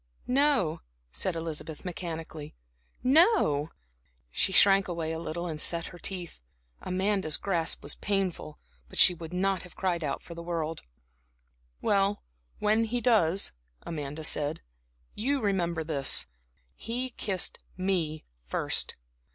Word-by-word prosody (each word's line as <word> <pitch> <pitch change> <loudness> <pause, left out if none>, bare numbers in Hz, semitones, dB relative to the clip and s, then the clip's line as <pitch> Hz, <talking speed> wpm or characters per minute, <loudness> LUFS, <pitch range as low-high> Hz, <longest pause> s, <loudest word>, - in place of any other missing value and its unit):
"No," 260 - +2 0.3
said 185 - -1
Elizabeth, 160 0 -5
mechanically, 165 -4 -6 0.5
"no." 265 - +4 0.6
She 190 - +2
shrank 195 +1 +6
away 165 -3 -2
a 160 - -3
little 170 +1 -4
and 155 -3 -3
set 170 -1 +3
her 175 - -11
teeth. 180 - -3 0.4
Amanda's 190 -3 +1
grasp 170 -5 -1
was - - -3
painful, 190 -6 -2 0.3
but - - -10
she 180 - +8
would 165 -1 -8
not 190 0 +1
have 180 - -13
cried 175 -3 0
out 145 - -2
for 170 - -9
worlds. 165 -2 -3 1.0
"Well, 200 0 +2 0.3
when 215 +2 +2
he 245 +2 -1
does," 200 -6 +4 0.3
Amanda 150 -1 -5
said, 150 0 +1 0.5
"remember 200 - 0
this 145 -4 0 0.5
he 245 - -4
kissed 195 -5 -1 0.2
me 175 -5 -1 0.2
first. - - -1
175 Hz, 120 wpm, -29 LUFS, 160-200 Hz, 1.0 s, she